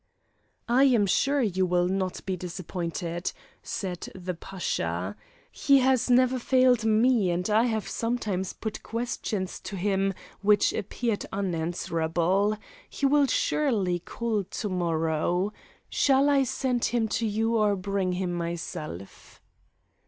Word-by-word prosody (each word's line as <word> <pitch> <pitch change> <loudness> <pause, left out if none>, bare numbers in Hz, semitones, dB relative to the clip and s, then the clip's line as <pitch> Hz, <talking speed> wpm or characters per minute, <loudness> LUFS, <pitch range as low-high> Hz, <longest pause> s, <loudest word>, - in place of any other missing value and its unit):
"I 255 +3 +5
am 240 -6 +4
sure 275 +8 +2
you 190 -4 +1
will 175 0 +2
not 185 -1 -2
be 190 - -1
disappointed!" 175 -1 -4 0.3
said 180 -3 -5
the 185 -1 -4
Pasha. 95 - -3 0.4
"He 280 -1 +4
has 260 -1 +2
never 255 +1 +4
failed 255 -2 +3
me, 220 -2 +3
and 175 +1 -1
I 220 +3 +4
have 220 -3 -1
sometimes 215 -6 -2
put 220 -1 -6
questions 225 -4 -3
to 195 - -7
him 195 0 0 0.3
which 205 0 +4
appeared 220 +2 -2
unanswerable. 175 +2 0 0.3
He 280 - -2
will 285 0 +4
surely 210 -13 +1
call 220 +3 -2
to 205 +3 -5
morrow. 175 +2 0 0.3
Shall 275 +1 +3
I 275 -1 +4
send 250 -1 0
him 235 -2 +1
to 225 +1 0
you 225 +2 0
or 210 -2 +3
bring 190 -1 -1
him 180 -1 -2
myself?" 165 - -6
200 Hz, 130 wpm, -27 LUFS, 180-235 Hz, 0.4 s, I